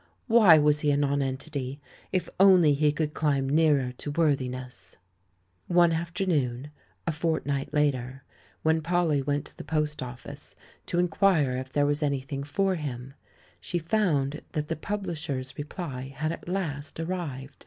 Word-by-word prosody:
Why 220 -9 +7
was 150 0 +3
he 150 - +1
a 145 - +3
nonentity? 140 -1 -2 0.3
If 185 - 0
only 185 -6 +7
he 150 +1 +3
could 150 0 -2
climb 140 -4 +1
nearer 145 -3 +3
to - - -5
worthiness! 130 -5 -2 0.7
One 175 -1 +5
afternoon, 160 -6 -1 0.3
a 165 - +1
fortnight 150 -3 -1
later, 135 -3 0 0.4
when 160 0 +3
Polly 165 -3 +1
went 145 +1 -1
to - - -16
the - - -7
post 150 -1 -1
office 130 +3 -8 0.3
to 175 - -2
inquire 175 -6 +3
if 130 +1 -5
there 145 +1 +2
was 145 +1 0
any 140 -2 +1
thing 135 +1 -5
for 190 +7 0
him, 135 -6 -5 0.5
she 175 - -3
found 160 -6 0
that 150 -3 -2
the - - 0
publishers' 155 -8 -4
re 145 - -5
ply 140 -6 -6
had 155 +2 -1
at 170 - -7
last 155 -6 -3
arrived. 150 -6 -4
150 Hz, 155 wpm, -27 LUFS, 135-165 Hz, 0.7 s, Why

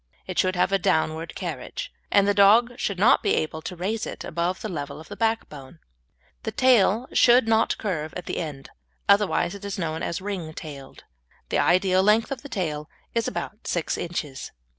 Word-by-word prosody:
It 185 - -3
should 185 0 +2
have 180 +2 +2
a 195 - +3
downward 160 -1 0
carriage, - - -5 0.2
and 200 0 +4
the 205 - +4
dog 215 +5 +6
should 200 - -1
not 210 +7 +5
be - - +2
able 155 0 -2
to 180 - -6
raise 205 +6 -2
it - - -7
above 170 +3 -2
the - - -3
level 145 -6 -5
of 160 - -13
the - - -7
backbone. 170 - -2 0.6
The - - -4
tail 240 -2 +4
should 240 -1 +5
not 225 0 +2
curve 160 -7 -3
at 180 - -6
the - - -4
end, 145 -5 -6 0.4
otherwise 200 -3 +3
it 200 - -10
is 200 -1 -4
known 160 -3 -3
as 170 - -2
"ring 185 -5 -5
tailed." 140 -3 -9 0.5
The - - +1
ideal 185 +1 +3
length 215 +6 +3
of 265 -3 -4
tail 155 - -3 0.2
is 230 -1 0
about 210 - -5
six 170 -3 -1
inches. 155 -6 -5
185 Hz, 185 wpm, -25 LUFS, 160-210 Hz, 0.6 s, dog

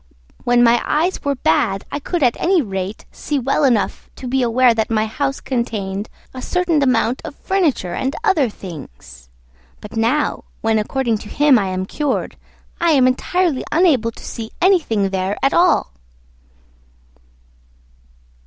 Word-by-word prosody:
When 245 0 +4
my 235 0 +4
eyes 335 +5 0
were 280 0 0
bad 195 -1 +1
I 290 - -3
could 335 +2 -2
at 245 -2 +3
any 370 0 +3
rate 195 - -4
see 295 - -3
well 275 +3 0
enough 240 -7 +1
to 255 - -8
be 265 +1 0
aware 245 0 +4
that 220 -1 -1
my 215 -1 +1
house 275 +5 -2
contained 215 -5 -3 0.2
a 255 - -7
certain 345 0 0
amount 250 -2 +1
of 295 - -8
furniture 315 - 0
and 265 +2 -2
other 325 - +2
things; 70 - -11 0.5
but 210 - -11
now, 235 +7 0 0.2
when 225 -1 +2
according 230 0 -1
to 210 - -10
him 290 -4 +4
I 195 - -1
am 185 0 -2
cured, 290 +7 -2 0.4
I 335 -1 +3
am 265 -3 +4
entirely 305 +4 +1
unable 300 -10 +3
to 230 - -12
see 225 -2 -6
anything 295 - +2
there 190 +1 -1
at 275 - +3
all." 350 - +3
245 Hz, 155 wpm, -19 LUFS, 210-295 Hz, 0.5 s, When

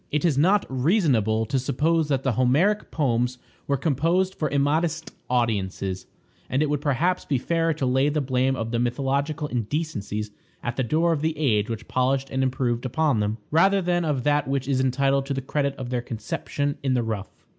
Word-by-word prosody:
It 150 +3 0
is 160 -5 +3
not 185 +8 +3
reasonable 130 - +2
to 135 +4 0
suppose 155 +5 +1
that 135 -3 0
the 130 - +1
Homeric 140 - +2
poems 125 -4 0 0.3
were 140 - +1
composed 165 +7 +1
for 155 -5 -2
immodest 155 +4 0 0.2
audiences, 100 -6 -1 0.4
and 135 +4 +1
it 150 - -1
would 145 -1 0
perhaps 160 +6 +1
be 140 - 0
fairer 165 +5 0
to 140 - -2
lay 130 +3 +2
the 150 +1 0
blame 130 -1 +1
of 115 -2 -4
the 120 - 0
mythological 140 +5 -1
indecencies 110 -4 -3 0.3
at 120 0 -2
the 130 - 0
door 165 +7 +2
of 150 - -2
the 155 0 -1
age 115 -8 +1
which 115 0 -5
polished 130 +1 0
and 130 - 0
improved 125 -2 0
upon 140 -1 +1
them, 105 +1 -1
rather 195 +6 +4
than 175 -1 0
of 145 -6 -1
that 145 0 +2
which 135 -1 -1
is 135 -2 +1
entitled 135 +1 +1
to 140 - -2
the - - -1
credit 140 +1 -1
of 130 -2 -6
their 125 -1 0
conception 125 +5 -3
in 135 -2 +1
the 120 - +1
rough. 110 -3 -3
135 Hz, 195 wpm, -24 LUFS, 125-155 Hz, 0.4 s, rather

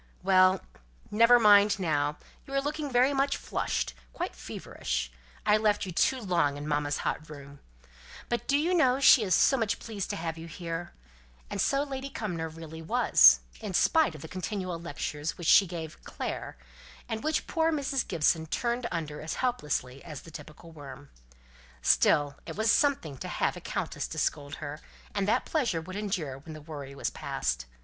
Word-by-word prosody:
"Well, 185 -1 +5 0.5
never 230 +3 +6
mind 205 -1 +6
now. 150 -5 0 0.3
You 275 - -5
are - - +4
looking 290 0 -3
very 255 +3 +4
much 275 0 +1
flushed; 65 - -2 0.2
quite - - -4
feverish! - - -4 0.3
I 210 - +5
left 210 -2 +1
you 185 - -5
too 260 +9 +2
long 170 - +1
in 145 +1 -6
mamma's 145 -1 0
hot 155 - -2
room. 140 -1 -11 0.7
But 240 -2 -2
do 280 - +3
you 330 +5 +1
know 265 -7 +3
she 270 -2 +7
is 190 -4 +2
so 270 - +4
much 225 -4 0
pleased 210 -4 -5
to - - -2
have 165 0 -4
you 165 - -8
here?" 165 +1 -5 0.6
And - - -1
so 275 +1 +2
Lady 275 -1 -5
Cumnor 175 -10 -4
really 160 0 -9
was, 240 +10 +6 0.2
in 210 -5 -5
spite 315 - +3
of 150 - -10
the - - -7
continual 185 0 -4
lectures 150 -1 -4
which 175 - -7
she 195 +4 +6
gave 165 -2 -7
"Clare," - - -5 0.5
and 225 -2 -4
which 310 0 0
poor 325 -1 +1
Mrs. 275 -4 -1
Gibson 160 -1 +1
turned 235 +7 -1
under 155 -3 -4
as 155 - -4
helplessly 150 - -2
as 155 -5 -8
the 165 - -12
typical 160 +2 -11
worm. 140 -2 -11 0.7
Still 145 - +3
it - - -6
was 220 +1 +2
something 265 - +1
to - - -5
have - - -1
a - - -9
countess - - -3
to - - -8
scold 145 -1 -1
her; 150 0 -7 0.3
and 200 -1 -1
that 235 +4 +2
pleasure 245 - 0
would 185 +4 -8
endure 180 -10 -3
when 155 +3 -10
the 155 - -10
worry 145 -3 -8
was - - -2
past. - - -3
180 Hz, 180 wpm, -29 LUFS, 155-235 Hz, 0.7 s, she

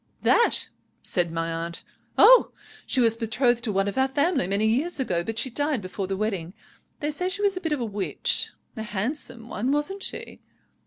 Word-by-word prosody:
"'That?' 470 - +3 0.4
said 175 -2 0
my 165 0 -2
aunt. 165 +1 -4 0.3
'Oh! - - +7 0.3
she 265 - +2
was 230 -2 +4
betrothed 235 +1 +1
to 220 - 0
one 195 0 +1
of 200 +6 -2
our 265 - +4
family 285 - +1
many 200 +3 +1
years 275 +10 +1
ago, 175 -10 0
but 225 +4 -5
she 260 - 0
died 290 +1 0
before 190 0 -5
the 195 0 -2
wedding. 195 -4 -3 0.5
They 295 +1 -1
say 360 +5 -2
she 405 +2 -3
was 400 -1 +3
a 370 - -4
bit 325 -4 -2
of 300 - 0
a - - 0
witch. 205 -2 -1 0.3
A 220 - -5
handsome 230 +3 -4
one, 240 +3 -1
wasn't 295 +8 0
she?' - - -6
230 Hz, 200 wpm, -25 LUFS, 195-295 Hz, 0.5 s, Oh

